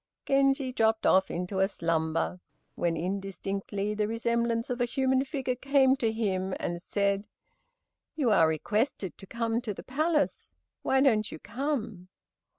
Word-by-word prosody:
Genji 275 Hz, -1 st, +2 dB
dropped 225 Hz, -2 st, +1 dB
off 190 Hz, 0 st, +4 dB
into 180 Hz, +2 st, -3 dB
a 190 Hz, -, +4 dB
slumber, 165 Hz, -1 st, -1 dB, 0.3 s
when 170 Hz, -1 st, -1 dB
indistinctly 195 Hz, +3 st, -3 dB
the 210 Hz, 0 st, 0 dB
resemblance 235 Hz, +1 st, 0 dB
of 245 Hz, 0 st, -2 dB
a -, -, +4 dB
human 265 Hz, +1 st, +1 dB
figure 270 Hz, -2 st, -2 dB
came 265 Hz, +1 st, +3 dB
to 230 Hz, -3 st, +1 dB
him 190 Hz, -4 st, -1 dB
and 175 Hz, 0 st, -3 dB
said, 200 Hz, +1 st, 0 dB, 0.9 s
"You 265 Hz, -8 st, +2 dB
are 165 Hz, -6 st, +5 dB
requested 205 Hz, -, -1 dB
to 195 Hz, -, -11 dB
come 230 Hz, +1 st, -1 dB
to 215 Hz, -5 st, -4 dB
the -, -, -9 dB
palace, 300 Hz, +3 st, 0 dB, 0.3 s
why 265 Hz, 0 st, +2 dB
don't 215 Hz, -6 st, +3 dB
you -, -, -6 dB
come?" 235 Hz, -, -3 dB
220 Hz, 150 wpm, -29 LUFS, 190-260 Hz, 0.9 s, are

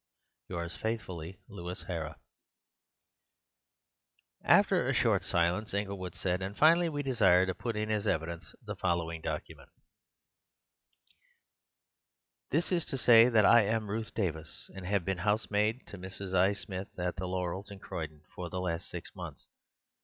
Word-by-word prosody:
— -, -, -55 dB
Yours 85 Hz, -1 st, -4 dB
faithfully, 95 Hz, -5 st, -4 dB
Louis 90 Hz, -2 st, -7 dB
Hara." 80 Hz, -3 st, -4 dB, 2.3 s
After -, -, +5 dB
a -, -, +1 dB
short -, -, +3 dB
silence 90 Hz, +5 st, 0 dB
Inglewood 100 Hz, -3 st, -3 dB
said: 90 Hz, 0 st, -1 dB
"And, 95 Hz, +2 st, -4 dB
finally, 165 Hz, +2 st, +6 dB
we 145 Hz, -2 st, -3 dB
desire 95 Hz, -9 st, +4 dB
to 95 Hz, -, -1 dB
put 115 Hz, +4 st, -4 dB
in 105 Hz, 0 st, -1 dB
as 105 Hz, -1 st, 0 dB
evidence 85 Hz, +1 st, -2 dB
the -, -, -4 dB
following 85 Hz, -2 st, -1 dB
document:— 80 Hz, -1 st, -5 dB, 2.8 s
"This 165 Hz, +7 st, 0 dB
is 175 Hz, -3 st, +2 dB
to 135 Hz, -, -3 dB
say 120 Hz, -1 st, +7 dB
that 110 Hz, -4 st, +5 dB
I 120 Hz, -, +8 dB
am 110 Hz, 0 st, 0 dB
Ruth 110 Hz, +1 st, -4 dB
Davis, 80 Hz, -7 st, -3 dB
and 95 Hz, -1 st, -7 dB
have 100 Hz, -3 st, +1 dB
been 95 Hz, -2 st, -1 dB
housemaid 105 Hz, +3 st, +1 dB
to 100 Hz, -, -9 dB
Mrs. 95 Hz, +1 st, -7 dB
I. 95 Hz, +2 st, +4 dB
Smith 95 Hz, -1 st, -6 dB
at 90 Hz, 0 st, -2 dB
'The 90 Hz, +1 st, -3 dB
Laurels' 90 Hz, +2 st, -3 dB
in 100 Hz, -, -8 dB
Croydon 80 Hz, -5 st, -6 dB
for 90 Hz, -1 st, -5 dB
the 90 Hz, -, -3 dB
last 90 Hz, -1 st, -2 dB
six -, -, -7 dB
months. -, -, -8 dB
95 Hz, 150 wpm, -31 LUFS, 90-110 Hz, 2.8 s, I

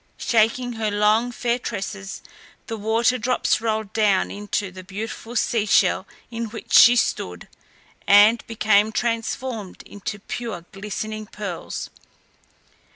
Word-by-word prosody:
Shaking 235 Hz, +2 st, +1 dB
her 220 Hz, -2 st, -1 dB
long, 210 Hz, +4 st, +2 dB
fair 240 Hz, 0 st, -1 dB
tresses, 195 Hz, -4 st, -5 dB, 0.4 s
the 225 Hz, -, -5 dB
water 225 Hz, +4 st, +1 dB
drops 250 Hz, -1 st, +1 dB
rolled 220 Hz, -2 st, -2 dB
down 210 Hz, -4 st, +2 dB
into 205 Hz, -1 st, -3 dB
the 185 Hz, 0 st, -10 dB
beautiful 220 Hz, +4 st, -7 dB
sea 220 Hz, -2 st, +1 dB
shell -, -, +3 dB, 0.2 s
in 230 Hz, 0 st, -3 dB
which 215 Hz, -, -8 dB
she 240 Hz, +1 st, +9 dB
stood, 90 Hz, -, -1 dB, 0.6 s
and 205 Hz, +3 st, +6 dB
became 215 Hz, -1 st, +3 dB
transformed 230 Hz, -2 st, -3 dB
into 205 Hz, +1 st, -6 dB
pure 210 Hz, -4 st, -6 dB
glistening 215 Hz, +2 st, -5 dB
pearls. 200 Hz, -6 st, -6 dB
215 Hz, 120 wpm, -23 LUFS, 205-230 Hz, 0.6 s, she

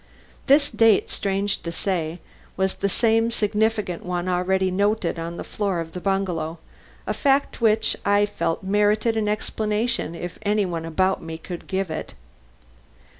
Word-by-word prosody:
This 285 Hz, +1 st, +5 dB
date 225 Hz, -3 st, +4 dB
strange 200 Hz, 0 st, -1 dB
to 170 Hz, -, -4 dB
say 170 Hz, -2 st, -2 dB, 0.4 s
was 190 Hz, 0 st, +1 dB
the 200 Hz, -, -1 dB
same 225 Hz, +2 st, +2 dB
significant 210 Hz, -4 st, 0 dB
one 180 Hz, 0 st, -2 dB
already 185 Hz, +1 st, +1 dB
noted 200 Hz, -2 st, +1 dB
on 170 Hz, +1 st, -5 dB
the -, -, -4 dB
floor 200 Hz, -4 st, -2 dB
of 165 Hz, -1 st, -5 dB
the 180 Hz, -, -6 dB
bungalow 180 Hz, -5 st, -1 dB, 0.5 s
a -, -, -1 dB
fact 275 Hz, -3 st, +1 dB
which 220 Hz, -1 st, +3 dB
I 205 Hz, 0 st, +4 dB
felt 205 Hz, -4 st, -2 dB
merited 210 Hz, +3 st, +2 dB
an 220 Hz, -1 st, 0 dB
explanation 215 Hz, -3 st, -1 dB
if 175 Hz, +1 st, -6 dB
any 210 Hz, 0 st, +1 dB
one 170 Hz, -2 st, -3 dB
about 185 Hz, +4 st, +1 dB
me 160 Hz, 0 st, -6 dB
could 175 Hz, +1 st, -8 dB
give 190 Hz, -3 st, -1 dB
it. 160 Hz, -, -5 dB
195 Hz, 155 wpm, -24 LUFS, 175-215 Hz, 0.5 s, This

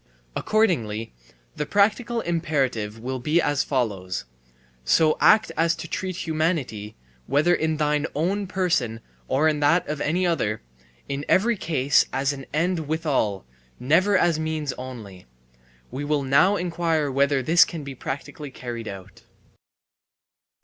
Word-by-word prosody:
Accordingly 115 Hz, -, 0 dB, 0.4 s
the 150 Hz, -, -3 dB
practical 225 Hz, +3 st, +2 dB
imperative 135 Hz, -, -1 dB
will 130 Hz, +3 st, -4 dB
be 150 Hz, +7 st, +2 dB
as 145 Hz, -4 st, +1 dB
follows: 100 Hz, -, -2 dB, 0.6 s
So 155 Hz, -, +3 dB
act 215 Hz, 0 st, +5 dB
as 165 Hz, 0 st, +2 dB
to 165 Hz, -, -7 dB
treat 185 Hz, +1 st, -4 dB
humanity, 155 Hz, -, -2 dB, 0.3 s
whether 150 Hz, +6 st, +3 dB
in 160 Hz, -2 st, 0 dB
thine 150 Hz, -1 st, +1 dB
own 190 Hz, +6 st, 0 dB
person 160 Hz, -13 st, 0 dB, 0.3 s
or 145 Hz, +4 st, +2 dB
in 155 Hz, -1 st, +1 dB
that 150 Hz, +5 st, +3 dB
of 150 Hz, -1 st, -4 dB
any 175 Hz, +5 st, +1 dB
other, 125 Hz, -11 st, -1 dB, 0.4 s
in 140 Hz, +1 st, -3 dB
every 230 Hz, +5 st, +3 dB
case 145 Hz, -7 st, +2 dB
as 135 Hz, +2 st, 0 dB
an 135 Hz, -1 st, -9 dB
end 165 Hz, 0 st, 0 dB
withal, 145 Hz, -, -1 dB, 0.3 s
never 185 Hz, +10 st, +3 dB
as 170 Hz, -3 st, +2 dB
means 155 Hz, -3 st, -2 dB
only. 110 Hz, -, -9 dB, 0.6 s
We 140 Hz, -, -4 dB
will 145 Hz, -1 st, 0 dB
now 140 Hz, +9 st, +4 dB
inquire 165 Hz, -5 st, 0 dB
whether 140 Hz, 0 st, +2 dB
this 165 Hz, +6 st, +6 dB
can 165 Hz, -4 st, -6 dB
be 140 Hz, -1 st, -7 dB
practically 140 Hz, +3 st, -6 dB
carried 120 Hz, -3 st, -7 dB
out. 95 Hz, -2 st, -9 dB
150 Hz, 135 wpm, -24 LUFS, 130-170 Hz, 0.6 s, this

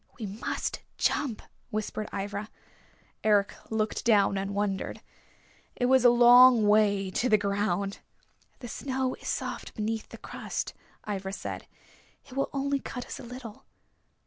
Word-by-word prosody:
"We 220 Hz, -, -3 dB
must 205 Hz, +4 st, -3 dB, 0.2 s
jump," 255 Hz, -7 st, 0 dB, 0.3 s
whispered 215 Hz, 0 st, -3 dB
Ivra. 200 Hz, +1 st, -4 dB, 0.7 s
Eric 205 Hz, -2 st, +3 dB, 0.2 s
looked 220 Hz, -1 st, -1 dB
down, 205 Hz, -4 st, +4 dB
and 195 Hz, +1 st, -2 dB
wondered. 200 Hz, -2 st, -2 dB, 0.8 s
It 245 Hz, -, 0 dB
was 260 Hz, 0 st, +5 dB
a 245 Hz, -, +9 dB
long 240 Hz, -1 st, +8 dB
way 205 Hz, -2 st, +3 dB
to 250 Hz, +6 st, 0 dB
the 215 Hz, -, +6 dB
ground! 200 Hz, -1 st, -1 dB, 0.6 s
"The 245 Hz, -, -6 dB
snow 260 Hz, +2 st, -2 dB
is -, -, -10 dB
soft -, -, -4 dB
beneath 220 Hz, +1 st, -3 dB
the -, -, -10 dB
crust," -, -, -5 dB, 0.3 s
Ivra 195 Hz, -2 st, -3 dB
said. -, -, -6 dB, 0.6 s
"It -, -, -14 dB
will 275 Hz, -, 0 dB
only 280 Hz, 0 st, 0 dB
cut 250 Hz, -2 st, -6 dB
us -, -, -7 dB
a -, -, -9 dB
little." 240 Hz, -3 st, -9 dB
215 Hz, 145 wpm, -28 LUFS, 200-245 Hz, 0.8 s, a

